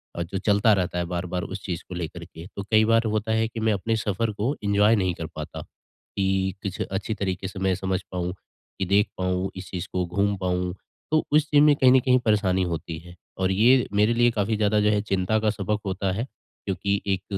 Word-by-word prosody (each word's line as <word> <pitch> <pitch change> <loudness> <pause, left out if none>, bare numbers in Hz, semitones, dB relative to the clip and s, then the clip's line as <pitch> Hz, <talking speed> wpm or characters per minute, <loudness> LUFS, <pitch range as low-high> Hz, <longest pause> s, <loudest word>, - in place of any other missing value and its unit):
और 85 - -2
जो 95 +3 -5
चलता 105 +1 +4
रहता 90 -2 -1
है, 85 - 0
बार-बार 90 +1 -3
उस 95 +1 -6
चीज़ 85 -3 -4
को 90 - -6
लेकर 85 0 -5
के। 85 -1 -11
तो 100 - -4
कई 110 0 +5
बार 115 +1 +4
होता 110 +1 -1
है 110 0 +2
कि 115 0 -7
मैं 110 -1 +2
अपने 110 +4 -1
सफर 110 +1 -1
को 115 +8 -1
एन्जॉय 105 +2 +4
नहीं 95 -4 +1
कर 80 - -5
पाता। 75 -1 -6
कि 95 -1 -3
कुछ 95 -2 -4
अच्छी 95 +3 -2
तरीके 95 -3 -3
से 95 0 -8
मैं 95 -1 +1
समझ 95 +1 -2
पाऊँ, 90 -1 -2
की 95 0 -9
देख 100 +3 +3
पाऊँ, 90 +1 -1
इस 95 0 -8
चीज़ 90 -2 -4
को 90 -1 0
घूम 100 +4 0
पाऊँ, 90 -1 -1 0.4
तो 155 0 +3
उस 150 0 +3
चीज़ 145 -1 +5
में 150 -1 +6
कहीं 130 -3 +5
न 130 - +7
कहीं 125 0 +3
परेशानी 95 -4 +2
होती 85 -2 -4
है। 90 +1 -14 0.2
और 95 0 +1
ये 120 +6 +4
मेरे 105 +3 +3
लिए 120 0 +4
काफ़ी 110 -1 0
ज़्यादा 105 0 +2
जो 105 - +3
है 105 -1 +2
चिंता 95 +1 0
का 110 0 +1
सबक 105 0 -1
होता 95 0 -1
है, 110 - -2 0.4
क्योंकि 100 +1 -1
एक 95 0 -3
100 Hz, 230 wpm, -25 LUFS, 90-110 Hz, 0.4 s, न